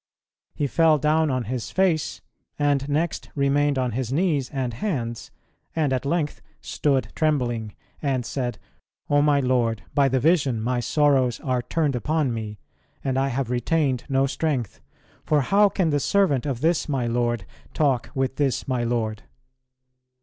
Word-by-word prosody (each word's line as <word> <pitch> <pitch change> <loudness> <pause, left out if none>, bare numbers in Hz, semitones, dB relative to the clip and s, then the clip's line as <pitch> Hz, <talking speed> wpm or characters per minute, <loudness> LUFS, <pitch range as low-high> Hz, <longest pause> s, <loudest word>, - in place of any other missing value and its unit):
He 145 - -1
fell 160 +2 +4
down 155 +2 +2
on 130 -2 0
his 120 +1 -4
face, 180 -5 0 0.4
and 145 -1 +1
next 155 +3 -1
remained 140 0 +2
on 125 -2 0
his 125 +1 -3
knees 150 -4 +1
and 130 -4 -3
hands, 120 - -3 0.5
and 150 -4 +1
at 130 +1 -1
length 155 -1 -1 0.2
"stood 135 -3 0
trembling," 120 -8 0 0.3
and 130 -4 -1
said 120 -3 -3 0.5
"O 145 0 +5
my 145 -1 +3
Lord, 120 -5 +1
by 140 -1 +3
the 130 0 +1
vision 145 -5 +2
my 120 +3 0
sorrows 135 -2 +2
are 130 -2 0
turned 150 +1 0
upon 150 0 0
me, 110 -2 -5 0.5
and 135 -1 -1
I 135 - +1
have 130 -2 -2
retained 130 +1 0
no 135 0 +3
strength. 135 -5 -2 0.4
For 150 -1 +2
how 200 +8 +4
can 180 -5 0
the 145 - +2
servant 150 -5 +2
of 130 -4 -3
this 165 0 +1
my 135 -4 0
Lord 120 -3 0 0.3
talk 135 -6 +1
with 135 0 -1
this 140 -3 0
my 125 -3 0
Lord?" 115 -2 -1
135 Hz, 155 wpm, -24 LUFS, 125-150 Hz, 0.5 s, O